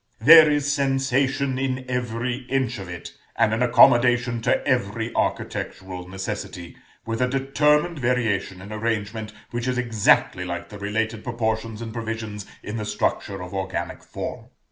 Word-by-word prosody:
There 155 +6 +9
is 145 -1 +1
sensation 135 -1 +1
in 130 -1 -2
every 125 0 -2
inch 130 -4 0
of 95 -2 -8
it, 85 -1 -8 0.2
and 110 - +3
an 115 - -1
accommodation 120 0 +5
to - - +1
every - - 0
architectural 90 -1 -3
necessity, 95 -2 -6 0.3
with 115 +1 -3
a 125 - +3
determined 150 +5 +2
variation 115 -7 0
in 105 +2 -8
arrangement, 110 0 -2 0.2
which 120 +1 -3
is 125 -1 0
exactly 115 -4 +2
like - - -5
the 105 - -10
related 110 +2 -2
proportions 115 -1 -2
and 115 -1 -7
provisions 110 -3 -5 0.2
in 105 +2 -5
the 105 - -3
structure 105 -2 -2
of 90 - -9
organic 95 -1 -4
form. - - -6
115 Hz, 145 wpm, -24 LUFS, 105-130 Hz, 0.3 s, There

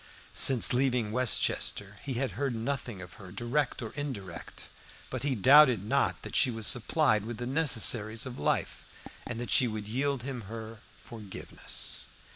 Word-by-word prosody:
Since 130 -2 +6
leaving 125 -4 +1
Westchester 105 -4 0
he 135 -3 -4
had 130 -1 -1
heard 130 +4 -2
nothing 115 -4 -4
of 90 -1 -12
her, 95 -2 -11
direct 120 +6 -1
or 110 - -6
indirect; 100 - -7 0.5
but - - -3
he 140 -2 0
doubted 130 -2 +6
not 140 +5 0
that - - -7
she - - +5
was 115 -2 -4
supplied 120 -2 +2
with 115 +1 -6
the 120 - -4
necessaries 120 -6 +2
of 130 -1 -7
life, 75 - -1 0.4
and 120 -2 -5
that 120 - -5
she 130 -2 +4
would 110 -2 -5
yield 135 +2 -1
him 130 -2 -5
her 110 0 -8 0.2
forgiveness. 105 -4 -8
120 Hz, 160 wpm, -30 LUFS, 110-135 Hz, 0.5 s, Since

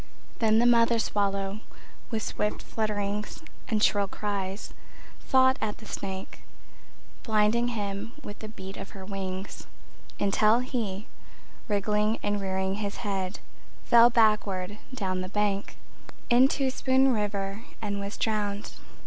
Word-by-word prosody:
Then 220 -1 +4
the 235 - +4
mother 235 -1 +5
swallow 200 -2 0 0.5
with 220 -2 -2
swift 210 - -2
flutterings 210 +3 -2 0.2
And 220 -4 +1
shrill 200 -1 +3
cries 200 -1 -4 0.5
Fought 260 -1 +4
at 210 -1 -2
the 220 - -13
snake, 190 -2 -5 0.8
Blinding 220 +1 +2
him 210 -1 -3
with 205 - -8
the 215 - -7
beat 195 -2 -9
of 195 - -8
her 190 - -8
wings, 190 -1 -5 0.5
Until 210 +2 +4
he, 220 -6 -3 0.6
wriggling 210 +1 +1
and 205 0 0
rearing 190 +1 -1
his 200 -1 -2
head, 195 -1 -2 0.4
Fell 235 0 +7
backward 210 -4 +2
down 190 -7 -2
the 185 - -5
bank 205 0 -1 0.5
Into 265 +2 +4
Spoon 265 0 +3
River 205 -1 -2 0.2
and 205 -2 -2
was 200 +1 -5
drowned. 210 -2 -1
210 Hz, 125 wpm, -28 LUFS, 195-225 Hz, 0.8 s, Fell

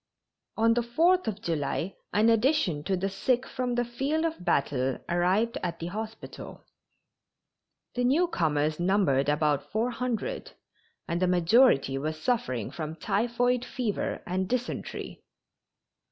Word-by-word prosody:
On 225 +1 +4
the 240 - +1
Fourth 330 +10 +2
of 210 -1 -3
July 165 +3 -2 0.2
an 215 +2 +4
addition 225 - +2
to 190 -1 0
the 190 +2 -1
sick 240 +6 0
from 250 -1 -2
the 245 0 +1
field 275 +7 -1
of 320 - -3
battle 135 -6 +1
arrived 185 +7 +1
at 170 -2 -3
the 165 - -6
hospital. 220 +1 -7 1.3
The 245 - -1
newcomers 165 - +1
numbered 175 -7 +2
about 150 -1 +1
four 225 +3 0
hundred, 250 - -3 0.5
and 170 +1 -2
the 185 - +3
majority 175 - +4
were 155 +3 -2
suffering 155 - -1
from 155 -1 -5
typhoid 240 +6 0
fever 245 -4 -3
and 185 +1 -2
dysentery. 250 0 -4
205 Hz, 130 wpm, -28 LUFS, 165-245 Hz, 1.3 s, On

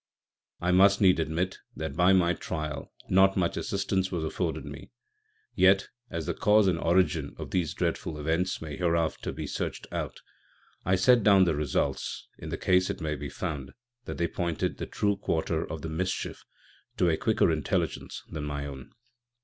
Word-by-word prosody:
I 90 +1 +1
must 100 +2 +6
needs 95 -4 +5
admit 85 +4 -1 0.2
that 80 -3 -4
by 90 +3 +5
my 90 -2 +4
Trial 75 -2 -5 0.2
not 95 +1 +4
much 85 -2 +1
Assistance 95 -2 -1
was 85 -3 -2
afforded 80 - -2
me: - - -9 0.6
yet, 95 +1 +4 0.2
as 85 -2 -4
the - - -1
Cause 105 0 +4
and 90 -3 +2
Origin 85 -4 +1
of - - -7
these 85 -5 0
Dreadful 80 - -2
Events 80 +5 0
may 75 -3 -6
hereafter 85 -2 0
be - - -5
search'd - - -4
out, - - -4 0.7
I 95 - +3
set 120 +6 +5
down 100 -2 +6
the 85 -3 +2
Results, 75 -3 -2
in - - -7
the - - -3
case 90 0 +3
it - - -3
may 80 -3 -2
be 75 -1 -5
found 75 -3 -5 0.3
that - - -5
they 85 - +1
pointed 85 -2 -2
the - - -5
true 100 -1 0
Quarter 80 -4 -1
of 80 -3 -6
the - - -3
Mischief 90 +4 -3 0.5
to 90 - +3
a 80 - +3
quicker 80 - +2
Intelligence 75 -4 -2
than 80 -2 -5
my 70 -1 -3
own. 65 -3 -9
85 Hz, 175 wpm, -28 LUFS, 80-95 Hz, 0.7 s, must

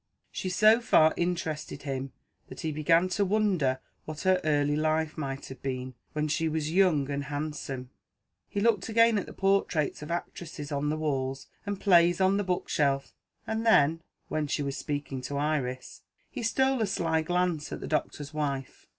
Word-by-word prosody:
She 185 - -3
so 215 +5 +5
far 160 -9 +5
interested 165 -4 -3
him, 135 -1 -4 0.4
that - - -9
he 160 -2 -2
began 165 +4 +3
to 200 +2 +1
wonder 190 -10 +1 0.3
what 155 -1 -6
her 185 -1 +3
early 145 -1 +2
life 155 0 0
might 135 -2 -4
have 135 - -10
been, 130 -1 -4 0.2
when 150 0 0
she 160 +2 0
was 155 0 -2
young 170 -7 +3
and 140 0 -2
handsome. 145 -3 -5 0.6
He 205 - -2
looked 220 -3 +2
again 230 -1 +4
at - - -6
the - - -8
portraits 195 -7 +1
of 150 - -7
actresses 170 -3 -5
on 145 +1 -1
the 155 - -1
walls, 135 -3 -2 0.2
and 205 - -1
the 195 - -17
plays 175 -2 +5
on 190 +1 +3
the 205 - 0
bookshelf 145 -6 0 0.3
and 220 0 -2
then 165 -7 +4 0.3
(when 155 -1 -1
she 145 +1 -1
was 140 -1 -3
speaking 145 -3 -4
to 140 +3 -4
Iris) 140 -4 -2 0.3
he 255 - -5
stole 265 +2 +2
a 215 - +2
sly 165 -4 0
glance 175 -2 -1
at - - -4
the - - -6
doctor's 150 -1 -2
wife. 140 -3 -3
155 Hz, 180 wpm, -28 LUFS, 145-185 Hz, 0.6 s, so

